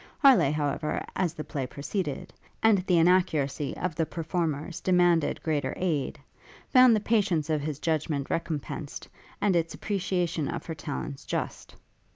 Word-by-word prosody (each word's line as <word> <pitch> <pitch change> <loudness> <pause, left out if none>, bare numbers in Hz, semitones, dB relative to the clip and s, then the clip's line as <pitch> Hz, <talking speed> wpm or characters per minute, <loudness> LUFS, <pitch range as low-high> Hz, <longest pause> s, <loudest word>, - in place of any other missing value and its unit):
Harleigh, 270 - +6
however, 150 0 -1
as 175 -3 0
the 155 - -5
play 135 -5 -4
proceeded, 155 +5 -4 0.3
and 220 -3 +5
the 180 - +4
inaccuracy 165 -5 +2
of 180 -2 -2
the 165 +2 0
performers 165 -1 -3
demanded 175 -3 +2
greater 155 -3 -1
aid, 160 -7 -1 0.5
found 255 -3 +7
the - - +2
patience 195 -8 +1
of 155 -2 +1
his 150 -1 -3
judgment 155 -3 -1
recompensed, 155 -3 -4 0.3
and 200 -3 +3
its 165 -1 0
appreciation 180 -6 -1
of 170 - -4
her 165 - -4
talents 145 -2 -5
just. - - -4
165 Hz, 145 wpm, -28 LUFS, 150-180 Hz, 0.5 s, found